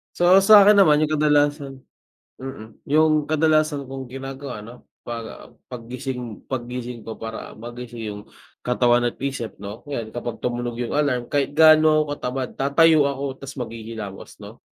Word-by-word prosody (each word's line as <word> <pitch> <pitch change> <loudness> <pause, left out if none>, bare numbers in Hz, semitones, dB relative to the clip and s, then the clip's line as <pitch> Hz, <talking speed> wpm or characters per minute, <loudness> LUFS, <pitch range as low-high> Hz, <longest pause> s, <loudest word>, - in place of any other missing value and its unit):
So 175 +2 +5
sa'kin 210 0 +8
naman 155 -7 +5
yung 155 - -3
kadalasan 145 -2 +1 0.6
mm, 130 -4 -10
yung 155 0 +3
kadalasan 155 -1 +2
kong 135 -1 -6
ginagawa 135 -2 -7
'no 115 +4 -13 0.2
pag 115 -1 -6 0.4
pag 120 -2 -10
gising 125 -3 -6
paggising 125 -2 -5
ko 110 - -8
para 115 0 -8
magising 120 0 -8
yung 105 - -9 0.4
katawan 120 -1 +2
at - - -17
isip 135 -4 -5
'no 100 +4 -8
'yan 115 -6 -5
kapag 120 -1 -5
tumunog 120 -1 -3
yung 120 -1 -3
alarm 140 -5 0
kahit 140 +1 0
gaano 155 -1 +6
katamad 130 -2 -4
tatayo 145 +1 +4
ako 135 -1 -5
ta's 135 +1 -9
maghihilamos 110 -4 -7
'no. - - -13
130 Hz, 145 wpm, -22 LUFS, 120-150 Hz, 0.6 s, sa'kin